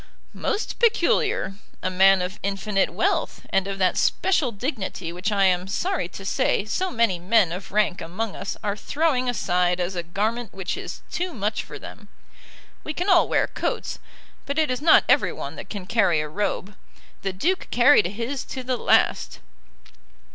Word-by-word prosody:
"Most 430 0 -3
peculiar; 450 - +2 0.3
a 185 - 0
man 190 0 +5
of 185 +3 -5
infinite 195 0 0
wealth, - - -1
and 195 0 +1
of 195 0 -4
that 185 -1 +2
special 335 -9 +2
dignity 200 - -4
which 185 +4 -2
I 200 -1 +3
am 180 0 +2
sorry 360 - -1
to 195 +2 -10
say 200 - +1
so 370 +12 -1
many 230 - +1
men 185 -1 +3
of 180 +3 -6
rank 205 -2 +1
among 195 +5 -4
us 200 - -5
are 205 -1 -1
throwing 275 +1 0
aside 180 -6 +1
as 180 +1 -2
a 175 - -1
garment 210 +6 -3
which 190 -2 -3
is - - -7
too 355 -1 -3
much 210 -1 -1
for - - -9
them. - - -11 0.8
We 310 - -5
can 360 +3 -1
all 360 -2 +5
wear - - +3
coats, - - -3 0.5
but 280 +1 -3
it 310 -4 +2
is 255 - -2
not 315 +1 +6
every - - +4
one - - -6
that - - -8
can 200 -4 -6
carry 185 -7 +2
a 150 - -2
robe. 195 +3 -3 0.5
The 195 - -2
Duke 340 - -1
carried 245 -4 +5
his 235 +8 -4
to 260 - -6
the 255 0 -1
last." - - +2
205 Hz, 175 wpm, -24 LUFS, 185-260 Hz, 0.8 s, not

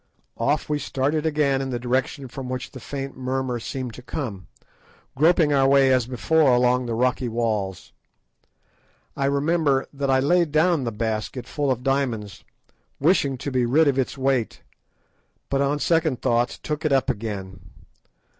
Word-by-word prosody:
Off 140 +5 0
we 150 -1 -1
started 145 +3 -1
again 145 -3 +1
in 135 - -3
the 125 - -2
direction 130 +3 -2
from 130 +1 -7
which 130 +1 -5
the 130 - -9
faint 135 +2 -6
murmur 130 -1 -2
seemed 125 0 -5
to 125 - -10
come, 110 - -5 0.7
groping 155 +1 +4
our 135 -1 +4
way 135 -1 +5
as 125 -2 +1
before 135 +1 +3
along 125 0 +2
the 115 - -2
rocky 125 +1 0
walls. 110 -5 -2 1.2
I 135 - -1
remember 140 0 +1
that 140 -1 -2
I 130 0 +4
laid 170 +3 +2
down 155 -2 +2
the 115 - -2
basket 110 +3 -3
full 145 -2 -2
of 125 -1 -1
diamonds, 125 -7 -1 0.6
wishing 140 -4 +2
to 140 - -5
be 130 -1 +1
rid 150 +6 +4
of 135 -1 +2
its 130 - -2
weight, 130 -3 -1 0.9
but 140 0 +1
on 140 +1 +1
second 155 -4 +1
thoughts 120 +2 +1
took 150 0 -4
it 155 - +1
up 135 -1 +2
again. 100 -4 -4
135 Hz, 165 wpm, -23 LUFS, 125-145 Hz, 1.2 s, way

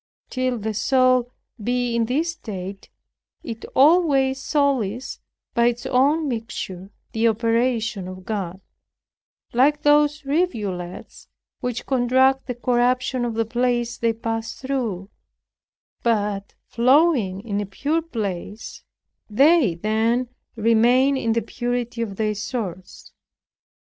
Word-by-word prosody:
Till 255 -1 -1
the 220 0 -3
soul 255 +2 +3 0.3
be 245 +1 0
in 230 -1 +2
this 305 +8 0
state, 195 - -8 0.5
it 230 -1 -7
always 275 -3 +4
sullies, 260 -6 0 0.3
by 235 -1 +3
its 240 0 -1
own 290 +5 +2
mixture, 220 -6 -5 0.2
the 225 +1 +2
operation 230 -2 0
of 185 0 -9
God; 190 -4 -4 0.9
like 285 +5 +3
those 295 0 +3
rivulets 210 - -3 0.3
which 245 -1 -4
contract 260 +1 +2
the 250 - -3
corruption 250 +1 +1
of 235 -2 -2
the 225 0 +1
places 240 0 -1
they 230 -1 +2
pass 225 0 -4
through, 230 -8 -3 0.9
but, 205 -3 -1
flowing 250 - +3
in 205 -2 -2
a 205 - -5
pure 295 +11 -1
place, 210 - -5 0.5
they 275 - +4
then 225 +6 0 0.3
remain 240 +5 +4
in 230 -4 0
the 230 - 0
purity 245 -1 -3
of 210 -4 -3
their 215 +1 0
source. 205 -4 -6
235 Hz, 115 wpm, -22 LUFS, 215-260 Hz, 0.9 s, always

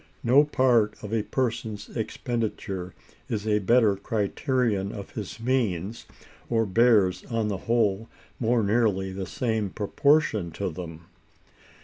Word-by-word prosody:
No 130 +5 +6
part 125 -7 +2
of 105 +1 -5
a 115 - +2
person's 115 -3 -2
expenditure 110 -5 -3 0.3
is 110 -2 -2
a 105 -1 +2
better 110 0 +4
criterion 105 0 -1
of 100 -2 -8
his 105 +1 -6
means, 115 -5 -1 0.4
or 115 -1 +2
bears, 105 -2 +3
on 115 -3 -1
the 100 - -2
whole, 110 -2 +1 0.3
more 120 -1 +2
nearly 100 -3 +1
the 95 -1 -5
same 110 -4 -1
proportion 110 - +1
to 100 -3 -3
them. 85 -1 -8
110 Hz, 125 wpm, -26 LUFS, 100-120 Hz, 0.4 s, No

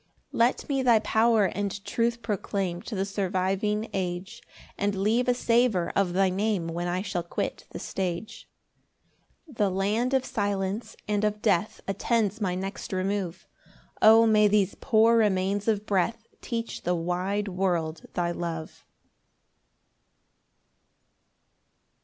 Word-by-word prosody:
3 - - -7
Let 235 +2 +2
me 275 -2 0
thy 240 -3 +5
power 220 0 +3
and 200 +1 -3
truth 235 0 -1
proclaim 195 -4 -2
To 225 - -6
the 190 0 0
surviving 195 +2 -1
age, 180 -1 -4 0.3
And 200 0 -1
leave 220 +6 +1
a 250 - +3
savour 235 -7 +2
of 190 -3 +1
thy 190 0 +3
Name 195 -2 0
When 175 +1 -3
I 180 +2 -1
shall 180 -3 -2
quit 170 - -4
the - - -8
stage. 185 +2 -4 1.0
4 - - -12
The 205 -3 +2
land 210 +7 0
of 260 -1 +1
silence 200 +1 -2
and 210 0 0
of 210 0 -1
death 205 -1 +1
Attends 210 +2 0
my 185 -3 0
next 195 +3 -5
remove; 190 -1 -2 0.6
O 225 +1 +8
may 215 -1 +5
these 205 -2 +2
poor 230 -1 +4
remains 200 -1 +1
of 210 -2 +1
breath 210 +4 0 0.2
Teach 230 -1 -4
the 180 +1 0
wide 180 +5 -1
world 175 -4 -1
thy 170 -1 0
love. 165 -2 -4
PAUSE. - - -24
200 Hz, 140 wpm, -27 LUFS, 185-220 Hz, 1.0 s, O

